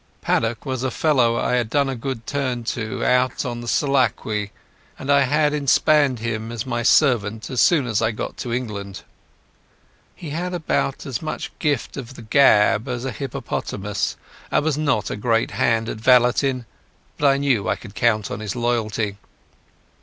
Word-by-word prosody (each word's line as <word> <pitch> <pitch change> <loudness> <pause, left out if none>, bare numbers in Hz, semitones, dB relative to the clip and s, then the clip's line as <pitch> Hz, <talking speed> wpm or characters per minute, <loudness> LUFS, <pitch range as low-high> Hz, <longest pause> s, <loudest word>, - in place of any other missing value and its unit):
Paddock 115 +3 0
was 130 -3 -3
a 130 - 0
fellow 125 -6 +2
I - - 0
had 120 -3 -1
done 140 +3 +2
a 135 - -2
good 120 -1 -5
turn 130 -4 -2
to 115 -2 -3
out 125 0 +2
on 120 -1 -4
the 120 - -8
Selakwe, 115 -7 +1 0.5
and 135 +2 -2
I 140 - +6
had 150 +2 +2
inspanned 145 -1 +3
him 110 0 -4
as 115 -3 -4
my 120 -2 -2
servant 115 -5 +2
as 125 - +1
soon 155 -7 +4
as 115 -3 0
I 110 - +2
got 110 - -5
to 120 - -5
England. 105 -5 -4 1.1
He 160 -4 -8
had 180 +4 -3
about 155 -4 -1
as 130 -4 -4
much 155 - -5
gift 145 -5 -1
of 130 -1 -7
the 120 - -10
gab 110 -2 +4
as 125 0 -3
a 135 - -2
hippopotamus, 105 -7 -3 0.3
and - - +1
was 160 -3 +1
not 140 -9 0
a - - -2
great 115 +2 0
hand 115 -1 +1
at - - -4
valeting, 125 +2 +3 0.5
but 145 - +4
I 135 0 +4
knew 135 -7 +1
I - - +2
could 100 - -12
count 110 -1 +1
on 100 - -4
his 110 -3 -4
loyalty. 115 -4 -1
120 Hz, 175 wpm, -22 LUFS, 110-140 Hz, 1.1 s, I